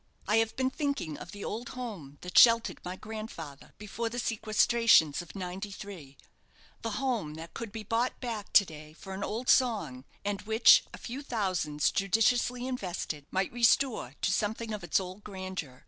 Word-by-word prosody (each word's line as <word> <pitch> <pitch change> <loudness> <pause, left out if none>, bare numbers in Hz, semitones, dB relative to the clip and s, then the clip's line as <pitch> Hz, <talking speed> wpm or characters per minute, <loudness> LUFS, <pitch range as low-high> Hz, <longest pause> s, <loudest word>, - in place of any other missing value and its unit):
I 210 +2 +3
have 225 0 +1
been 260 0 0
thinking 280 - -2
of - - -9
the 205 -1 -7
old 230 +3 -4
home 185 - -7
that 180 0 -8
sheltered 230 -1 +6
my 180 +1 -5
grandfather 200 -10 -8
before 210 +2 -4
the 240 - -6
sequestrations 220 -7 +3
of 175 - -12
'93 185 -5 -7 0.6
the 225 - -2
home 235 - -1
that 165 +1 -9
could 230 -3 -6
be 220 0 -6
bought 230 +4 -1
back 225 -5 -5
to 200 - +8
day 155 -2 -11
for 190 +4 -9
an 195 +1 -4
old 230 +5 -3
song, 200 - +2 0.2
and 205 -1 -1
which 220 +2 +6
a - - -9
few 255 +4 -6
thousands, 185 - 0
judiciously 235 +5 +2
invested, 180 - -4
might 190 +3 -1
restore 240 - +2
to - - +2
something 220 +2 -1
of 210 - -5
its 175 - +2
old 185 +2 -7
grandeur. 185 -9 -6
205 Hz, 170 wpm, -30 LUFS, 175-230 Hz, 0.6 s, to